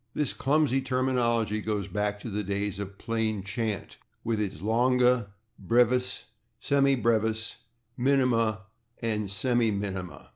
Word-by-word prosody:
This 150 -3 0
clumsy 140 -1 +2
terminology 125 -4 +1
goes 105 -3 -2
back 105 +1 -2
to 115 - -6
the 105 +1 -1
days 100 0 -2
of 100 0 -6
plain 110 -3 -1
chant, 105 -1 -3 0.3
with 110 -2 0
its 100 -3 -2
/longa/, 125 +5 +2 0.4
/brevis/, 125 +4 +2 0.4
/semi 140 -2 +2
brevis/, 110 0 0 0.4
/minima/ 120 -5 +2 0.4
and 105 -2 -1
/semiminima 100 -4 -1
115 Hz, 115 wpm, -28 LUFS, 105-125 Hz, 0.4 s, clumsy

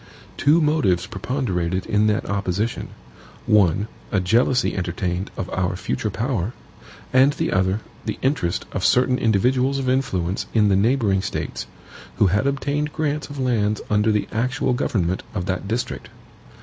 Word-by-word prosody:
Two 150 +4 +4
motives 150 - +2
preponderated 95 -5 -2
in 105 +1 +2
that 105 0 0
opposition: 100 +2 -1 0.6
one, 100 -1 +3 0.2
a 100 - +2
jealousy 120 +7 +2
entertained 90 +1 -2
of 90 - -3
our 95 0 -1
future 105 +3 -2
power; 115 -1 -2 0.6
and 135 +3 +5
the - - -2
other, 95 +3 +1 0.3
the - - -2
interest 130 - 0
of - - -3
certain 125 0 +3
individuals 125 +5 +2
of 135 -1 -2
influence 100 -9 0
in 105 -2 +4
the 95 - +4
neighboring 105 -2 +2
States, 95 - -4 0.5
who - - +3
had 100 +7 +2
obtained 145 +2 -1
grants 150 -1 -2
of 145 - -8
lands 110 -5 +1
under 105 +1 +3
the 105 -1 0
actual 125 +3 0
government 95 -7 0
of 90 -3 -2
that 95 +1 -2
district. 115 +4 -3
105 Hz, 150 wpm, -22 LUFS, 95-130 Hz, 0.6 s, and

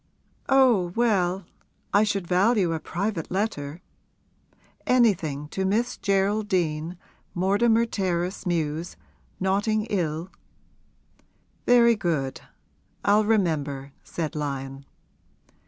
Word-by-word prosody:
'Oh 245 -10 +4
well, 195 -6 +1 0.5
I 205 +2 +5
should 200 -3 -1
value 185 0 +2
a 160 - -2
private 180 +1 -3
letter! 180 -5 -3 1.0
Anything 170 - +2
to 190 - -2
Miss 225 +6 0
Geraldine, 190 -5 0 0.4
Mortimer 220 +6 +3
Terrace 185 -3 -2
Mews, 165 -1 -2 0.4
Notting 205 +3 +1
'ill 170 -2 -2 0.7
' - - -39
'Very 235 -1 +6
good; 160 -10 -2 0.6
I'll 210 +1 +4
remember,' 150 -10 0
said 160 -2 -4
Lyon. 135 -2 -4
185 Hz, 90 wpm, -25 LUFS, 160-210 Hz, 1.0 s, Very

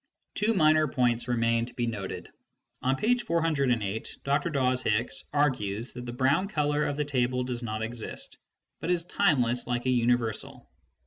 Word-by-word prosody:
Two 220 +2 +1
minor 155 -2 +5
points 120 -2 +1
remain 115 -1 +1
to 120 - -13
be 120 - 0
noted. 105 -5 -5 0.5
On 130 +1 +2
page 240 - +2
408, 140 - 0
Dr. 140 +5 +1
Dawes 130 -4 +1
Hicks 120 +4 -1
argues 125 -7 0
that 125 0 -7
the - - -3
brown 135 +9 +2
colour 150 -5 +1
of 145 - -2
the 150 - 0
table 125 -2 0
does 125 -1 -3
not 110 -2 -3
exist, 115 0 -5 0.4
but - - -4
is 175 -2 +2
timeless 130 -10 +2
like 120 0 -1
a 130 - +3
universal. 120 -2 0
125 Hz, 165 wpm, -28 LUFS, 120-150 Hz, 0.5 s, minor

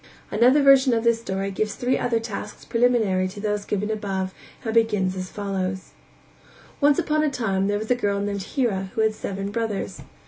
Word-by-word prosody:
Another 255 +6 +5
version 270 -2 +6
of 225 - 0
this 235 -1 +2
story 195 -2 -3
gives 210 +2 -2
three 250 +1 0
other 235 -2 0
tasks 210 -2 -7
preliminary 230 -6 +2
to 195 +3 -9
those 210 -1 -2
given 210 +1 -1
above 195 -3 -3 0.3
and 225 - -1
begins 210 -5 +2
as 185 -1 -5
follows: 190 -2 -3 0.9
Once 290 -1 +4
upon 305 0 +1
a 305 - +2
time 195 -7 0
there 205 0 +1
was 220 +3 -4
a - - +5
girl 200 -4 0
named 200 0 -2
Hira 195 -3 -1
who 220 - +1
had 220 0 +2
seven 195 -1 -4
brothers. 225 -2 -3
210 Hz, 185 wpm, -24 LUFS, 195-235 Hz, 0.9 s, version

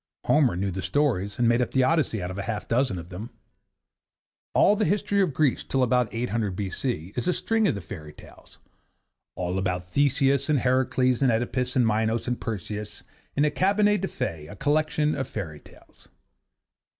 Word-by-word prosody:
Homer 140 - +3
knew 95 +2 -1
the 95 +1 -4
stories 105 -7 0
and 120 - +2
made 120 +1 +3
up 125 - 0
the 130 - +2
'Odyssey' 130 - +1
out 90 - -4
of 95 - -7
half 105 +1 -3
a - - -21
dozen 120 -4 +1
of 85 0 -8
them. 100 +6 -7 1.3
All 205 - +5
the 215 - 0
history 200 +2 +1
of 185 -5 +2
Greece 150 -5 +2
till 135 -1 0
about 125 -1 +2
800 115 -4 -2
B.C. 100 - -3
is 125 - -2
a 180 - +3
string 225 +2 +1
of - - +1
the 100 - -5
fairy 80 -7 -9
tales, - - -16 0.8
all 90 +1 -2
about 90 -2 -2
Theseus 140 - +2
and 150 - +4
Heracles 130 0 +1
and 130 -3 +4
Oedipus 125 +2 -1
and 125 -2 +4
Minos 110 +1 0
and 125 0 -2
Perseus 105 -1 -5 0.3
is 145 - +3
a 150 - +2
Cabinet 205 +1 +2
des 195 - -1
Fes, 75 - -4
a 105 - -9
collection 150 +3 +1
of 135 - -3
fairy 80 -8 -5
tales. - - -20
120 Hz, 185 wpm, -26 LUFS, 100-145 Hz, 1.3 s, All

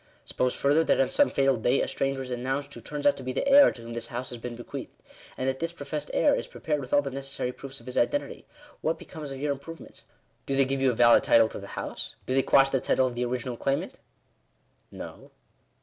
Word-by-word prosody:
Suppose 125 -1 -1
further, 145 +3 +3
that - - +3
on 135 - +2
some 290 - +4
fatal 135 -2 +2
day 120 +4 +2
a - - 0
stranger 135 -1 -1
is 130 - -8
announced, 135 +3 -3
who 120 - -8
turns 145 +5 -6
out 190 - +5
to - - -8
be 130 0 -3
the 205 - -1
heir 280 +1 +8
to 115 - -11
whom 115 0 -7
this 115 0 -3
house 120 +1 -5
has 120 - -7
been 120 +1 -6
bequeathed; 120 - -8 0.4
and 130 - -2
that 130 0 -1
this 165 0 -2
professed 170 - -5
heir - - +3
is - - -2
prepared 155 - -3
with 130 - -9
all 145 - +4
the 135 - -4
necessary 135 -1 -3
proofs 135 +2 -9
of 115 - -17
his 125 - -1
identity: 290 - -1 0.3
what 160 +1 0
becomes 155 -4 -9
of 135 - -6
your 145 +1 0
improvements? 140 +4 -9 0.4
Do 135 - 0
they 135 0 +4
give 135 0 -2
you 135 - +4
a 125 - 0
valid 120 0 +6
title 115 -1 +5
to - - -7
the 100 0 -10
house? - - -5
Do 130 - -2
they 135 - +4
quash 135 0 +4
the 135 - +1
title 130 - +2
of 125 - -2
the 120 +1 -1
ori 125 +1 -1
ginal 125 -1 -6
claimant?" 135 0 -2 0.9
"No." - - -10
135 Hz, 250 wpm, -27 LUFS, 125-145 Hz, 0.9 s, heir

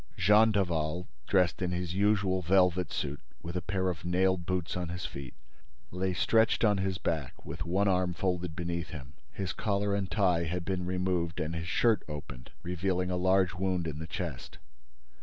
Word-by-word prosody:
Jean 105 +4 +6
Daval, 85 -4 0 0.2
dressed 90 -3 +2
in 90 - 0
his 90 -1 -2
usual 100 -1 +2
velvet 90 -1 +3
suit, 70 0 -3 0.2
with 85 +1 -6
a 90 - 0
pair 95 +2 -1
of 85 -3 -2
nailed 90 0 +1
boots 90 -2 -1
on 90 -2 -3
his 90 +1 -4
feet, 70 -3 -7 0.6
lay 95 +1 -1
stretched 110 +6 +3
on 105 -2 +3
his 95 -1 0
back, 80 -6 -3
with 85 - -5
one 95 +4 +2
arm 90 -2 +2
folded 90 -2 -1
beneath 85 -2 -3
him. 70 -4 -9 0.2
His 95 +3 -3
collar 100 -1 0
and 100 -2 -1
tie 90 -5 +2
had 85 +1 -3
been 90 -2 -2
removed 90 -2 -1
and 80 +2 -2
his 85 +1 -4
shirt 110 +3 +3
opened, 75 -5 -7
revealing 90 +1 -1
a - - 0
large 95 -1 +3
wound 95 -2 -1
in 75 -2 -4
the 80 - -5
chest. 80 -4 -5
90 Hz, 180 wpm, -30 LUFS, 85-95 Hz, 0.6 s, Jean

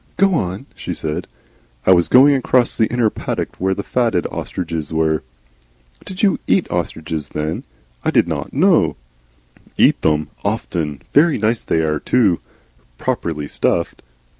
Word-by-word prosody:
"Go 195 0 +4
on," 95 - -2
she - - -5
said. 75 -1 -4 0.6
"I - - +5
was 85 -1 +3
going 140 +3 +7
across 130 -2 +2
the 110 - +2
inner 120 -3 +2
paddock - - -4
where 95 +1 +1
the 100 - -4
fatted 115 -8 0
ostriches 80 -3 -4
were." 80 -1 +1 0.8
"Did 190 +1 -6
you 195 - +3
EAT 190 - +3
ostriches, 80 -3 -3
then? 75 +2 -3 0.4
I - - +1
did - - +3
not - - -4
know - - +3 0.4
" - - -32
"Eat - - +4
them! 75 -1 +1
often. 85 -9 -2
Very 155 +2 +5
nice 110 +2 0
they 80 - 0
ARE 75 -1 0
too, 100 -6 +2 0.6
properly 75 +1 -2
stuffed. 85 +3 -1
90 Hz, 150 wpm, -19 LUFS, 80-120 Hz, 0.8 s, going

